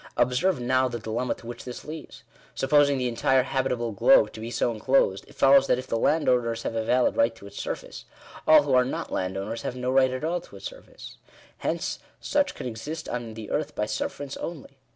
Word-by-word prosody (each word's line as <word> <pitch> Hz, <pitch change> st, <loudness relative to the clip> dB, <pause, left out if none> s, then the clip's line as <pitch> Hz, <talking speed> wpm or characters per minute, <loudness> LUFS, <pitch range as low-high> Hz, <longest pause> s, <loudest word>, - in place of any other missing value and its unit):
Observe 130 Hz, +7 st, +2 dB
now 130 Hz, +1 st, +2 dB
the 120 Hz, -1 st, -4 dB
dilemma 115 Hz, +3 st, -2 dB
to -, -, -16 dB
which 120 Hz, 0 st, -7 dB
this 125 Hz, -1 st, -8 dB
leads. 155 Hz, 0 st, -9 dB, 0.3 s
Supposing 145 Hz, 0 st, +3 dB
the 125 Hz, -1 st, 0 dB
entire 125 Hz, +2 st, +2 dB
habitable 125 Hz, -3 st, -1 dB
globe 270 Hz, -, +5 dB
to -, -, -9 dB
be 115 Hz, +1 st, -5 dB
so 120 Hz, -, 0 dB
enclosed, 110 Hz, -4 st, +1 dB
it -, -, -17 dB
follows 135 Hz, 0 st, +6 dB
that -, -, +3 dB
if 130 Hz, -, -5 dB
the -, -, -2 dB
landowners 120 Hz, -7 st, +2 dB
have -, -, -3 dB
a 115 Hz, -1 st, -1 dB
valid 125 Hz, +3 st, +2 dB
right 115 Hz, 0 st, +2 dB
to 115 Hz, -, -14 dB
its 100 Hz, -, -11 dB
surface, -, -, -6 dB, 0.4 s
all 155 Hz, -1 st, +8 dB
who 140 Hz, -2 st, -1 dB
are 125 Hz, 0 st, +6 dB
not 125 Hz, -, -4 dB
landowners, 95 Hz, +5 st, -3 dB
have 125 Hz, -, -4 dB
no 125 Hz, 0 st, -2 dB
right 130 Hz, 0 st, +4 dB
at 130 Hz, +2 st, -4 dB
all 170 Hz, +2 st, -1 dB
to -, -, -15 dB
its -, -, -10 dB
surface. -, -, -10 dB, 0.4 s
Hence, -, -, -2 dB, 0.2 s
such 290 Hz, 0 st, 0 dB
can -, -, -7 dB
exist 125 Hz, +7 st, -5 dB
on 120 Hz, -2 st, -5 dB
the 110 Hz, -2 st, -8 dB
earth 150 Hz, 0 st, -2 dB
by 105 Hz, -, 0 dB
sufferance 135 Hz, +6 st, -4 dB
only. 140 Hz, -5 st, -7 dB
125 Hz, 215 wpm, -26 LUFS, 115-140 Hz, 0.4 s, all